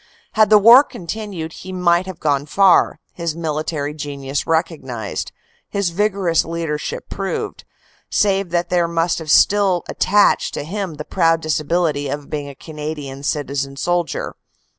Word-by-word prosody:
Had 215 -2 +4
the 215 - +8
war 230 +6 +8
continued 180 - -6
he 185 - -9
might 180 0 +2
have 185 -3 -7
gone 145 -1 0
far, 195 +2 +4
his 170 -2 -3
military 155 -2 -3
genius 140 -2 -4
recognized, 155 - -2 0.4
his 200 -4 -1
vigorous 195 -3 +1
leadership 165 -2 -4
proved, 195 0 -4 0.4
save 195 -2 +1
that 175 0 -1
there 175 -1 +2
must 165 0 0
have 160 -2 -8
still 195 +1 +4
attached 205 +2 +2
to - - -3
him 185 0 -4
the 150 0 -7
proud 165 0 +2
disability 155 -1 0
of 145 -1 -5
being 145 -2 -3
a 140 - -10
Canadian 150 -3 -7
citizen 140 -1 -2
soldier. 175 +2 -1
165 Hz, 140 wpm, -19 LUFS, 150-185 Hz, 0.4 s, the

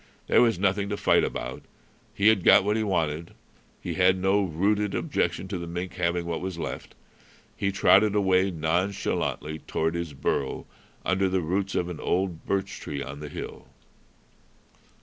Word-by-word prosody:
There - - +4
was 115 -4 +3
nothing 100 +1 +1
to 105 - -2
fight - - +3
about. 60 +2 -4 0.5
He 100 +2 +5
had 105 -5 +2
got - - +7
what 105 +2 +1
he 110 - +1
wanted. 85 -5 -1 0.4
He - - -4
had 90 0 +4
no 95 +2 +2
rooted 100 +4 0
objection 90 - -1
to 95 -3 -3
the 85 - -6
mink 90 +1 -5
having 85 0 -1
what 85 -1 -3
was 95 -2 -4
left. - - -6 0.6
He 100 - -1
trotted 100 +2 +4
away 95 -1 +3
nonchalantly 80 -2 -1
toward 80 +1 0
his 85 -3 -4
burrow 65 0 -2 0.4
under 95 +1 +2
the 95 0 +1
roots 95 +4 -1
of 85 - 0
an 90 -2 -6
old 90 -2 -1
birch 100 0 -1
tree 70 -2 -5
on 70 +2 -8
the 75 0 -7
hill. - - -8
90 Hz, 170 wpm, -26 LUFS, 85-100 Hz, 0.6 s, got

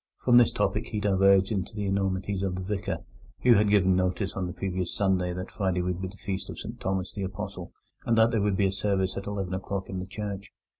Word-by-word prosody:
From 120 -1 +4
this 120 -2 +6
topic - - 0
he 105 - -3
diverged 95 -1 +4
to 105 - -13
the 105 -1 -2
enormities 95 0 -1
of 95 -2 -1
the 95 - -4
Vicar, 100 +1 -3 0.4
who 125 - +7
had 105 -1 +4
given 95 -3 +4
notice 95 +2 0
on 95 -2 -2
the - - -4
previous 95 -1 -3
Sunday 95 -3 +1
that 90 +1 -5
Friday 95 -3 0
would 90 0 -2
be 95 - -2
the 95 +2 -12
Feast 95 -1 -4
of - - -7
St - - -7
Thomas 95 -1 -2
the 100 - -5
Apostle, 95 0 -5 0.3
and 115 - +1
that 110 +1 +5
there 110 - +1
would 100 -1 +1
be 95 -2 +3
service 95 -1 0
at 100 - -5
eleven 100 -3 -3
o'clock 95 +1 -3
in 95 - -3
the 90 - -5
church. 100 -1 -5
95 Hz, 235 wpm, -27 LUFS, 95-100 Hz, 0.4 s, who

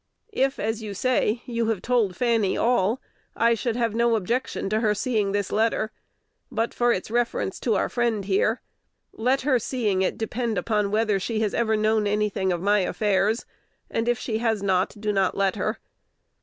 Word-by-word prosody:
If, 270 -4 +1
as 220 +1 -2
you 210 -2 -6
say, 245 -1 +1
you 230 -2 -1
have 225 -4 0
told 230 -7 +1
Fanny 230 -3 +1
all, 235 0 +2 0.4
I 235 0 +3
should 230 0 -2
have 230 -3 0
no 235 0 +2
objection 230 +3 -2
to 215 - +2
her 215 -2 +2
seeing 210 -2 0
this 205 -1 -1
letter, 220 0 +1 0.6
but 230 +1 -1
for 240 0 +2
its 185 0 -2
reference 235 -5 -1
to 230 - +1
our - - +1
friend 235 -5 -1
here: 205 +4 +1 0.5
let 255 +4 +1
her 260 -2 +2
seeing 215 -6 -1
it 190 - 0
depend 225 0 -2
upon 210 +2 0
whether 210 -1 +1
she 220 +3 -2
has 210 -2 0
ever 220 -2 +1
known 215 0 +2
any 210 +1 +1
thing 190 -1 -1
of 175 0 -2
my 205 +1 +4
affairs; 205 +3 +1 0.5
and, 225 +1 -1
if 240 - +2
she 225 -3 -3
has 225 -3 0
not, 190 -1 +1
do 210 0 -1
not 195 -2 +1
let 195 -1 +1
her. 215 +2 -2
220 Hz, 190 wpm, -25 LUFS, 205-235 Hz, 0.6 s, my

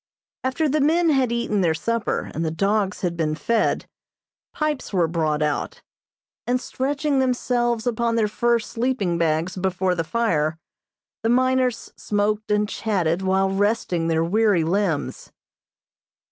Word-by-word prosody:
After 260 +5 0
the 300 +1 +1
men 325 +3 +3
had 265 -4 +2
eaten 235 -4 0
their 165 -3 +2
supper 230 +5 -2
and 165 - -2
the 160 - 0
dogs 195 +4 0
had 175 -2 -1
been 155 -2 -1
fed, 220 +9 0 0.7
pipes 305 -3 -2
were 180 -4 +2
brought 155 -2 0
out; 150 -1 -2 0.6
and, 250 +1 +2
stretching 280 +2 -1
themselves 240 -2 0
upon 235 -1 0
their 220 -2 +2
fur 235 +3 +2
sleeping 230 -6 -1
bags 165 +2 0
before 185 0 0
the 170 -2 -1
fire, 160 -7 0 0.6
the 225 - 0
miners 255 -1 +1
smoked 210 +1 -1
and 210 0 +2
chatted 185 -6 -1
while 190 0 +1
resting 195 -4 0
their 165 0 +1
weary 200 0 +2
limbs. 175 -2 -1
210 Hz, 140 wpm, -23 LUFS, 170-240 Hz, 0.7 s, men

